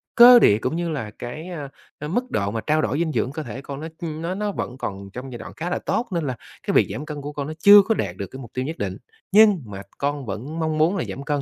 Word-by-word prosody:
cơ 245 0 +10
địa 105 - +5
cũng 125 +7 -2
như 170 0 -1
là 130 -10 -4
cái, 155 +9 -6
a, 150 -6 -6 0.3
à, 150 - -5
mức 245 +10 -2
độ 100 -1 0
mà 110 0 -3
trao 155 0 +1
đổi 140 - -1
dinh 165 -2 0
dưỡng 130 0 -1
cơ 155 +1 -5
thể 120 +3 -7
con 140 0 -7
nó, 160 - -4
ưm, 160 -2 -4
nó 175 +3 -2
nó 210 0 -1
vẫn 125 -9 -5
còn 100 -5 -5
trong 130 +1 -7
giai 120 - -6
đoạn - - -8
khá 170 +2 -3
là 180 - -1
tốt. 245 - -1
Nên 170 -4 -1
là 130 - -2 0.3
cái - - +1
việc - - +5
giảm 150 - -5
cân 150 -2 -6
của 145 +1 -6
con 145 -1 -4
nó 155 - -5
chưa 200 +4 +9
có 220 +3 0
đạt 95 - -2
được 100 - -4
cái 130 - -10
mục 120 -4 -10
tiêu 130 0 -2
nhất 160 +4 -5
định, - - -3 0.3
nhưng 205 -4 +6
mà 100 -2 -8 0.2
con 140 -1 -2
vẫn 120 +10 -5
mong 155 -1 -1
muốn 165 +6 +3
là - - -1
giảm 140 - -6
cân." 145 0 -1
150 Hz, 300 wpm, -23 LUFS, 125-170 Hz, 0.3 s, cơ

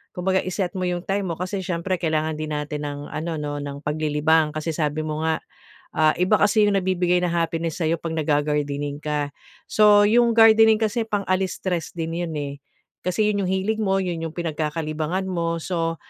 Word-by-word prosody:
Kumbaga 190 +1 +1
i-set 185 0 -2
mo 180 - 0
'yong 175 -1 -2
time 195 0 -1
mo 165 - -2
kasi 185 +4 -3
siyempre 180 0 -2
kailangan 155 -2 -1
din 155 -1 -3
natin 150 0 -3
ng 145 0 -5
ano 165 +1 -3
'no, 145 -1 -4
ng 140 0 -6
paglilibang 155 +1 +1
kasi 155 +1 -2
sabi 155 0 -1
mo 155 +1 -2
nga 160 -1 0 0.5
ah, 155 0 +4
iba 185 +4 +4
kasi 210 +1 +4
'yong 200 - +2
nabibigay 180 -2 +1
na 175 - 0
happiness 165 0 -1
sa 160 - +1
iyo 165 - +2
'pag 165 0 -5
nag-gagardening 145 -2 -1
ka. 150 -1 -2 0.3
So 210 -1 +5
'yong 230 +2 +4
gardening 225 -1 +7
kasi 225 +1 -1
pang-alis 190 -3 0
stress 175 -3 -2
din 165 -1 -3
'yon 165 -2 -3
eh. 140 -1 -3 0.5
Kasi 185 +4 0
'yon 205 -1 0
'yong - - -1
hilig 195 +4 0
mo, 195 -2 +1
'yon 175 -3 -3
'yong 165 -1 -5
pinagkakalibangan 155 +1 -2
mo. 170 -3 -1
So, 165 -2 -1
165 Hz, 190 wpm, -23 LUFS, 155-190 Hz, 0.5 s, gardening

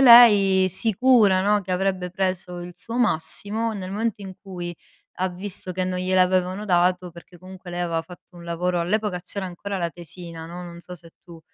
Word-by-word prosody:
lei 205 -7 +8
sicura, 210 0 +3
no, 205 +1 +3
che 185 -1 -4
avrebbe 185 -1 -1
preso 185 -1 -2
il 175 0 -8
suo 230 +5 -6
massimo, 215 +3 0
nel 190 -3 -6
momento 215 0 -2
in 190 -1 -7
cui 180 -3 -6 0.5
ha 185 - +2
visto 185 0 -6
che 185 +1 -2
non 185 0 -2
gliel'avevano 185 +1 +2
dato, 180 -1 +2
perché 170 +1 -15
comunque 185 0 -11
lei 175 - -3
aveva 165 -2 -1
fatto 175 +1 -15
un 170 - -11
lavoro 175 +1 -1
all'epoca 190 +2 0
c'era 190 +2 -5
ancora 195 +3 -5
la 170 -2 -1
tesina, 170 -1 -9
no, 175 +2 -8
non 170 -1 -9
so 175 +1 -10
se 170 -1 -14
tu 170 -2 -13
185 Hz, 185 wpm, -24 LUFS, 175-200 Hz, 0.5 s, lei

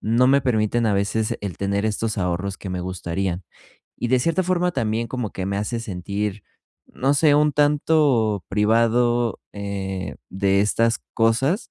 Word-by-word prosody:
no 115 +4 +3
me 140 +1 +5
permiten 115 -2 +1
a 105 - +2
veces 105 +2 0
el 100 -4 -5
tener 100 +1 -1
estos 110 +1 -1
ahorros 90 +1 -2
que 95 - -7
me 90 -1 -3
gustarían.Y 90 0 -4 0.5
de 130 - +3
cierta 165 +8 +1
forma 180 -1 0
también 115 +1 -1
como 125 -5 -3
que 95 0 -5
me 100 0 -2
hace 110 +3 -2
sentir, 100 +1 -4 0.4
no 135 +3 0
sé, 145 0 +4
un 150 0 +3
tanto 145 - +2
privado, 115 +3 +2
eh, 95 -2 -4
de 95 +1 +1
estas 115 +2 +2 0.2
cosas, 125 - +1
110 Hz, 155 wpm, -22 LUFS, 100-125 Hz, 0.5 s, me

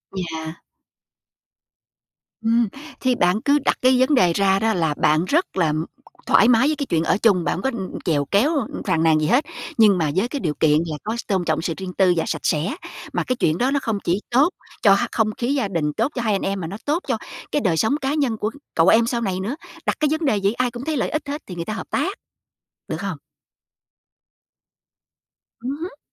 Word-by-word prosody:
Yeah. 160 -3 -4 1.9
Ừm, 230 +1 +2 0.3
thì 255 -1 +1
bạn 180 +1 +2
cứ 285 +3 +3
đặt - - +2
cái 255 0 +4
vấn 260 +3 +3
đề 180 -9 +4
ra 195 +1 +2
đó 220 +1 +1
là 165 -5 +1
bạn 155 +2 +2
rất 320 - 0
là 160 -4 +2 0.5
thoải 220 - +5
mái 245 +2 +5
với 310 - +1
cái 285 - -3
chuyện 165 -9 0
ở 165 - +2
chung, 205 -5 +3
bạn 150 - 0
hổng 185 - -4
có 265 - +1 0.3
chèo 145 -4 +1
kéo, 210 - +2 0.4
phàn 160 0 +2
nàn 160 -1 +4
gì 155 - 0
hết, 255 +7 +3 0.3
nhưng 210 -4 +6
mà 155 -4 0
với 195 +6 +2
cái 285 +3 -4
điều 160 - -1
kiện 150 -1 +4
là 155 -2 -4
có 220 +3 -3
s - - -3
tôn 190 -3 0
trọng - - 0
sự 165 - -2
riêng 190 -1 -6
tư 185 -2 +4
và 165 - +2
sạch 160 - -2
sẽ. 165 - 0 0.4
Mà - - 0
cái 255 - -1
chuyện 160 -8 +1
đó 255 +6 +1
nó 280 - +2
không 225 -3 -1
chỉ 175 +3 +1
tốt 275 +7 +4 0.3
cho 200 - +6
h 200 - +1
không 220 -2 +1
khí 245 +3 0
gia 265 -7 0
đình, 160 -6 -1
tốt 275 - 0
cho 245 - -1
hai 220 -3 +1
anh 195 - 0
em 195 0 -2
mà 165 - -4
nó 195 +5 -6
tốt 300 +4 +1
cho - - 0 0.3
cái 295 - +1
đời 180 -8 +1
sống 220 - +2
cá 270 +1 0
nhân 275 -7 0
của 215 +1 -2 0.2
cậu 165 +1 +4
em 225 +3 +6
sau 235 -1 -1
này 190 -4 -1
nữa. 210 +8 -3 0.3
Đặt - - 0
cái 305 - +2
vấn 315 +1 0
đề 215 -7 +2
vậy 200 +2 +2
ai 250 0 0
cũng 240 +2 -7
thấy 310 -1 -1
lợi - - 0
ích 305 -1 -3
hết 290 +2 -4
thì 180 - -7
người 170 -1 -4
ta 215 - -3
hợp - - -6
tác, - - 0 0.8
được - - -2
không? - - -3 2.5
Ừm 260 +3 -2
hứm. 325 -2 -7
215 Hz, 235 wpm, -22 LUFS, 170-255 Hz, 2.5 s, nhưng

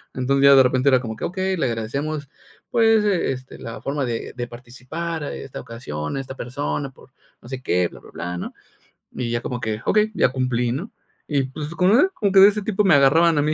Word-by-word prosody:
Entonces, 135 +2 +1
ya 140 0 +8
de 135 - +8
repente 130 +2 +2
era 130 -2 +5
como 110 -3 -5
que, - - -4
okey, 190 +1 -1
le 160 - +1
agradecemos, 140 +6 -3 0.4
pues, 225 -2 +4
este, 135 -10 -1
la 115 0 -8
forma 140 0 -2
de 115 -2 -4
de 120 -1 -4
participar, 130 +7 -6
eh, 145 - -5
esta 135 - -8
ocasión, 115 - -5
a 135 - -2
esta 130 0 -9
persona, 140 +2 -3
por 130 - -20 0.3
no - - -14
sé 130 -1 -5
qué, 90 -6 +1
bla, - - -14
bla, - - -15
bla, 90 +1 -5
¿no?, - - -6 0.6
y 125 -2 -3
ya 120 - -1
como 125 0 -4
que, 110 -1 -3
okey, 215 +1 +3
ya - - +3
cumplí, 125 -2 -1
¿no?, 175 - -5 0.4
y 140 -3 +1
pues, 145 +3 -6
con 180 +2 +3
una 290 - +5
como 205 - -1
que 195 - +7
de 200 - +10
ese 210 +1 -3
tipo 210 0 0
me 185 -6 +5
agarraban 155 +4 +5
a - - +4
mí. 150 +1 +1
135 Hz, 230 wpm, -22 LUFS, 120-170 Hz, 0.6 s, de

